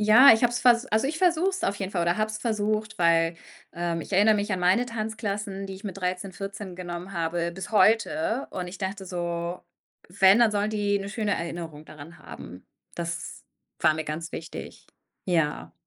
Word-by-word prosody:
Ja 220 Hz, +6 st, +8 dB
ich 220 Hz, -, -2 dB
habe 240 Hz, -, +3 dB
es 240 Hz, -, -1 dB
ver 245 Hz, -2 st, +6 dB
also, 220 Hz, +5 st, +2 dB
ich 310 Hz, -, -2 dB
versuche 350 Hz, +1 st, +3 dB
es 375 Hz, -2 st, -2 dB
auf 200 Hz, -, 0 dB
jeden 195 Hz, -1 st, -4 dB
Fall 175 Hz, -3 st, 0 dB
oder 175 Hz, +3 st, +1 dB
habe 215 Hz, 0 st, 0 dB
es 215 Hz, -, -4 dB
versucht, 215 Hz, -1 st, -1 dB
weil, 165 Hz, 0 st, +3 dB, 0.4 s
ähm, 170 Hz, -1 st, -2 dB
ich 195 Hz, -, -12 dB
erinner 210 Hz, +3 st, +5 dB
mich 205 Hz, +1 st, -1 dB
an 185 Hz, -, -1 dB
meine 185 Hz, +7 st, +3 dB
Tanzklassen, 210 Hz, -4 st, -4 dB
die 195 Hz, -, -7 dB
ich 195 Hz, +3 st, -13 dB
mit 200 Hz, -, -5 dB
13, 185 Hz, 0 st, -3 dB
14 195 Hz, -1 st, -7 dB
genommen 180 Hz, +1 st, -6 dB
habe 170 Hz, 0 st, -1 dB
bis 190 Hz, +4 st, -7 dB
heute 255 Hz, +7 st, +2 dB
und 180 Hz, -1 st, -5 dB
ich 185 Hz, -, -8 dB
dachte 190 Hz, 0 st, -4 dB
so, 175 Hz, 0 st, -3 dB, 0.5 s
wenn, 195 Hz, +2 st, +6 dB
dann 235 Hz, -2 st, +5 dB
sollen 205 Hz, 0 st, 0 dB
die 205 Hz, -1 st, +1 dB
'ne 195 Hz, -, -6 dB
schöne 210 Hz, -1 st, -1 dB
Erinnerung 165 Hz, -3 st, -6 dB
daran 155 Hz, +3 st, -12 dB
haben. 90 Hz, +1 st, -11 dB, 0.3 s
Das 170 Hz, 0 st, -5 dB, 0.4 s
war 155 Hz, -, +4 dB
mir 155 Hz, 0 st, -4 dB
ganz 160 Hz, +2 st, -5 dB
wichtig. 165 Hz, -, -8 dB, 0.4 s
Ja. 165 Hz, -5 st, 0 dB
195 Hz, 195 wpm, -26 LUFS, 170-215 Hz, 0.5 s, Ja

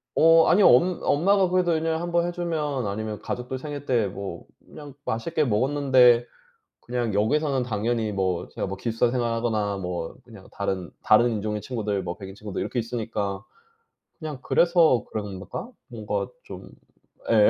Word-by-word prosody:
어 165 Hz, 0 st, +6 dB
아니요 195 Hz, +3 st, +6 dB
엄 175 Hz, +9 st, +4 dB
엄마가 190 Hz, +5 st, +3 dB
그래도 180 Hz, -2 st, +2 dB
1 160 Hz, -, -3 dB
년에 160 Hz, 0 st, 0 dB
1 175 Hz, +1 st, -4 dB
번 170 Hz, 0 st, +2 dB
해 175 Hz, -, -2 dB
주면 150 Hz, -8 st, -2 dB
아니면 105 Hz, +1 st, -4 dB
가족들 125 Hz, +1 st, -4 dB
생일 145 Hz, -1 st, -6 dB
때 120 Hz, -6 st, +2 dB
뭐 100 Hz, 0 st, -7 dB, 0.2 s
그냥 145 Hz, -2 st, -11 dB
맛있게 155 Hz, +8 st, -1 dB
먹었는데 125 Hz, 0 st, +4 dB, 0.6 s
그냥 120 Hz, -3 st, -2 dB
여기서는 135 Hz, +6 st, +1 dB
당연히 110 Hz, -1 st, -1 dB
뭐 95 Hz, -3 st, -1 dB
제가 -, -, -4 dB
뭐 95 Hz, 0 st, -5 dB
기숙사 115 Hz, +3 st, 0 dB
생활하거나 115 Hz, -4 st, -1 dB
뭐 90 Hz, -3 st, -4 dB
그냥 110 Hz, -6 st, -14 dB
다른 95 Hz, -3 st, -3 dB
다른 120 Hz, +3 st, +5 dB
인종의 105 Hz, 0 st, -2 dB
친구들 105 Hz, -3 st, -2 dB
뭐 90 Hz, -1 st, -5 dB
백인 95 Hz, -2 st, -9 dB
친구들 105 Hz, -2 st, -6 dB
이렇게 125 Hz, -, -3 dB
있으니까 110 Hz, -4 st, -3 dB, 0.8 s
그냥 155 Hz, -5 st, -6 dB
그래서 170 Hz, -5 st, +3 dB
그런가? 105 Hz, -, -6 dB, 0.2 s
뭔가 110 Hz, -4 st, -3 dB, 0.2 s
좀 -, -, -10 dB, 0.6 s
예. -, -, +6 dB
120 Hz, 325 characters per minute, -25 LUFS, 105-150 Hz, 0.8 s, 어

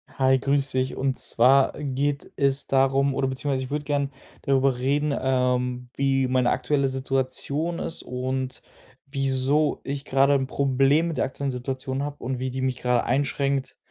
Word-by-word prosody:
Hi, 130 Hz, 0 st, +3 dB
grüß 140 Hz, +1 st, +1 dB
dich. 130 Hz, 0 st, -1 dB
Und 130 Hz, -1 st, -1 dB
zwar 130 Hz, +3 st, +4 dB
geht 140 Hz, 0 st, -2 dB
es 140 Hz, 0 st, +2 dB
darum 135 Hz, +1 st, +2 dB
oder 135 Hz, -, 0 dB
beziehungsweise 130 Hz, 0 st, -2 dB
ich 130 Hz, -, -7 dB
würde 150 Hz, 0 st, -2 dB
gerne 140 Hz, -1 st, 0 dB, 0.3 s
darüber 135 Hz, -1 st, +2 dB
reden, 145 Hz, +3 st, +1 dB
ähm, 125 Hz, -1 st, 0 dB
wie 135 Hz, -1 st, +1 dB
meine 125 Hz, -1 st, +2 dB
aktuelle 135 Hz, +2 st, +1 dB
Situation 135 Hz, +5 st, -2 dB
ist 165 Hz, -, -4 dB
und 130 Hz, +1 st, -3 dB, 0.4 s
wieso 135 Hz, +2 st, 0 dB
ich 140 Hz, 0 st, -5 dB
grade 135 Hz, +1 st, +3 dB
'n 135 Hz, -1 st, +1 dB
Problem 140 Hz, +4 st, +2 dB
mit 165 Hz, -, -4 dB
der -, -, +2 dB
aktuellen 140 Hz, +1 st, -3 dB
Situation 130 Hz, +1 st, -3 dB
habe 145 Hz, 0 st, -6 dB
und 130 Hz, +1 st, -3 dB
wie 130 Hz, +1 st, -2 dB
die 130 Hz, +1 st, -4 dB
mich 130 Hz, -1 st, -1 dB
grade 125 Hz, -1 st, +1 dB
einschränkt, 140 Hz, +1 st, -1 dB
135 Hz, 165 wpm, -25 LUFS, 130-140 Hz, 0.4 s, zwar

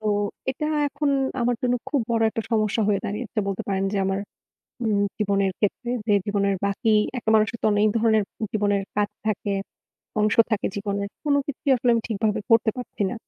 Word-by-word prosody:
তো 215 Hz, -, -5 dB, 0.4 s
এটা 300 Hz, +3 st, -3 dB, 0.2 s
এখন 285 Hz, 0 st, -1 dB, 0.3 s
আমার 245 Hz, +1 st, +2 dB
জন্য 245 Hz, 0 st, +2 dB
খুব 285 Hz, -, +1 dB
বড় 230 Hz, -1 st, +2 dB
একটা 225 Hz, -, -3 dB
সমস্যা 220 Hz, 0 st, +1 dB
হয়ে 200 Hz, -2 st, +2 dB
দাঁড়িয়েছে 215 Hz, +3 st, -4 dB
বলতে 195 Hz, -1 st, -2 dB
পারেন 195 Hz, 0 st, 0 dB
যে -, -, -1 dB
আমার, 195 Hz, 0 st, 0 dB, 0.6 s
হুম, 215 Hz, -3 st, +1 dB, 0.2 s
জীবনের 200 Hz, -2 st, +1 dB
ক্ষেত্রে 230 Hz, +4 st, -1 dB, 0.2 s
যে 210 Hz, -, +4 dB
জীবনের 200 Hz, -1 st, +1 dB
বাকি 210 Hz, +3 st, +1 dB, 0.3 s
একটা 225 Hz, -, -2 dB
মানুষের 215 Hz, +2 st, +2 dB
তো -, -, -1 dB
অনেক 210 Hz, +1 st, +4 dB
ধরনের 220 Hz, -2 st, +3 dB, 0.3 s
জীবনের 205 Hz, -2 st, +1 dB
কাজ 210 Hz, 0 st, +1 dB, 0.2 s
থাকে, 205 Hz, -1 st, -1 dB, 0.7 s
অংশ 210 Hz, 0 st, +3 dB, 0.2 s
থাকে 215 Hz, -2 st, 0 dB
জীবনে। 200 Hz, 0 st, -2 dB, 0.2 s
কোনো 285 Hz, -1 st, +3 dB
কিছুই 290 Hz, 0 st, -2 dB
আসলে 245 Hz, 0 st, +2 dB
আমি 230 Hz, -, +1 dB
ঠিকভাবে 220 Hz, 0 st, 0 dB
করতে 225 Hz, 0 st, +5 dB
পারছি 245 Hz, -4 st, -5 dB
না। -, -, -4 dB
215 Hz, 180 wpm, -24 LUFS, 200-235 Hz, 0.7 s, করতে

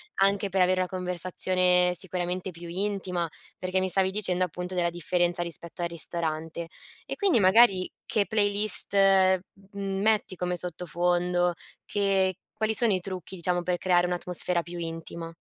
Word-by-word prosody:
anche 195 Hz, +1 st, +2 dB
per 190 Hz, 0 st, +1 dB
avere 185 Hz, +1 st, +3 dB
una 180 Hz, -, -2 dB
conversazione 180 Hz, 0 st, +1 dB
sicuramente 180 Hz, +1 st, -3 dB
più 170 Hz, 0 st, -10 dB
intima, 180 Hz, -2 st, -2 dB, 0.3 s
perché 185 Hz, +1 st, 0 dB
mi 190 Hz, -, 0 dB
stavi 190 Hz, 0 st, +3 dB
dicendo, 185 Hz, -3 st, +1 dB
appunto, 180 Hz, +1 st, -5 dB
della 175 Hz, -1 st, +1 dB
differenza 175 Hz, 0 st, 0 dB
rispetto 170 Hz, 0 st, -3 dB
al 170 Hz, -, +1 dB
ristorante. 165 Hz, 0 st, -3 dB, 0.4 s
E -, -, -5 dB
quindi 390 Hz, -, +3 dB
magari 190 Hz, -1 st, +5 dB, 0.2 s
che 210 Hz, -2 st, +1 dB
playlist 205 Hz, -1 st, +1 dB, 0.8 s
metti 200 Hz, 0 st, 0 dB
come 180 Hz, 0 st, -2 dB
sottofondo? 175 Hz, 0 st, 0 dB, 0.3 s
Che 195 Hz, -2 st, +1 dB, 0.2 s
quali 220 Hz, 0 st, -1 dB
sono 220 Hz, -2 st, +3 dB
i 185 Hz, -, +1 dB
trucchi, 185 Hz, 0 st, -6 dB
diciamo, 175 Hz, 0 st, -1 dB
per 175 Hz, 0 st, -1 dB
creare 180 Hz, -1 st, +2 dB
un'atmosfera 180 Hz, 0 st, -1 dB
più 175 Hz, 0 st, -8 dB
intima? 165 Hz, 0 st, -6 dB
180 Hz, 145 wpm, -27 LUFS, 175-195 Hz, 0.8 s, magari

